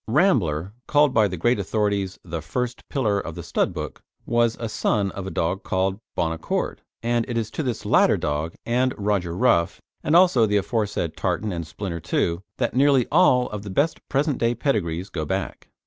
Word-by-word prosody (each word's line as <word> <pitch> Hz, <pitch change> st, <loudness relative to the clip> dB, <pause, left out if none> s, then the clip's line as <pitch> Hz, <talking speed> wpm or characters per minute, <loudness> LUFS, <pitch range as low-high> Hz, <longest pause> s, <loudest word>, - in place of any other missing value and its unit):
Rambler 105 Hz, -, +2 dB
called 145 Hz, -2 st, +4 dB
by 110 Hz, -3 st, +4 dB
the 90 Hz, -2 st, -5 dB
great 120 Hz, +7 st, +2 dB
authorities 100 Hz, -1 st, -1 dB
the 85 Hz, -2 st, -5 dB
first 125 Hz, +8 st, -4 dB
pillar 110 Hz, -8 st, +1 dB
of 85 Hz, -4 st, -6 dB
the -, -, -6 dB
stud -, -, 0 dB
book -, -, -6 dB, 0.2 s
was 120 Hz, -1 st, +2 dB
a 115 Hz, -, -2 dB
son 105 Hz, -2 st, 0 dB
of 95 Hz, -1 st, -6 dB
a -, -, -2 dB
dog 90 Hz, +2 st, -1 dB
called 95 Hz, +1 st, -1 dB, 0.2 s
Bon 80 Hz, -, 0 dB
Accord, 80 Hz, -, -2 dB, 0.2 s
and 120 Hz, 0 st, +1 dB
it 120 Hz, -, -2 dB
is 110 Hz, -2 st, -2 dB
to -, -, -3 dB
this 125 Hz, -6 st, -3 dB
latter -, -, +4 dB
dog 75 Hz, +2 st, -2 dB
and 125 Hz, +2 st, +1 dB
Roger 100 Hz, -4 st, -1 dB
Rough, 85 Hz, -9 st, +2 dB, 0.2 s
and 155 Hz, -, +2 dB
also 170 Hz, -11 st, +6 dB
the 105 Hz, 0 st, +2 dB
aforesaid 100 Hz, -6 st, -1 dB
Tartan 95 Hz, +3 st, -1 dB
and 85 Hz, -3 st, -4 dB
Splinter 85 Hz, -1 st, -5 dB, 0.2 s
II. 85 Hz, 0 st, +1 dB, 0.2 s
that 120 Hz, -1 st, -1 dB
nearly 135 Hz, -2 st, +4 dB
all 130 Hz, -7 st, +5 dB
of 105 Hz, -1 st, -4 dB
the 105 Hz, -, -8 dB
best 140 Hz, +12 st, +1 dB
present 140 Hz, 0 st, +1 dB
day 115 Hz, +1 st, +1 dB
pedigrees 95 Hz, -, -1 dB
go 80 Hz, -, -3 dB
back. 75 Hz, -, -4 dB
105 Hz, 195 wpm, -24 LUFS, 90-125 Hz, 0.2 s, also